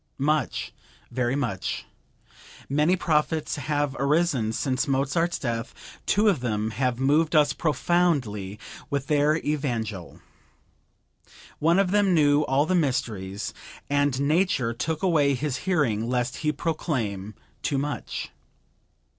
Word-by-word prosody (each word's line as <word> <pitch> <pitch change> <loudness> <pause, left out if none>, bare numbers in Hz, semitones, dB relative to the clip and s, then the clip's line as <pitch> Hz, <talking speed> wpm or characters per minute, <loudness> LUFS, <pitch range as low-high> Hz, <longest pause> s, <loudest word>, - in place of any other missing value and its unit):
Much; 150 -1 0 0.4
very 125 +1 0
much. 120 -9 -2 0.8
Many 150 +6 +3
prophets 155 -2 0
have 145 0 -1
arisen 140 -5 +2
since 130 +5 -1
Mozart's 140 +6 +1
death; 115 -3 -3 0.3
two 210 +2 +3
of 190 -9 +3
them 110 -3 -1
have 125 +2 -1
moved 150 +4 +2
us 145 -2 +5
profoundly 145 - 0 0.3
with 140 -1 -1
their 150 0 +3
evangel. 115 - -3 1.4
One 165 +3 +3
of 195 -2 +2
them 200 -3 +3
knew 145 -2 +4
all 135 +2 +2
the 185 - 0
mysteries, 110 - -1 0.4
and 145 -2 +2
Nature 145 -5 +2
took 155 +7 -3
away 150 -6 +3
his 140 0 -2
hearing 120 - +1
lest 125 0 -1
he 150 -1 0
proclaim 115 - -3 0.3
too 140 - 0
much. 145 +2 -4
145 Hz, 120 wpm, -26 LUFS, 120-155 Hz, 1.4 s, us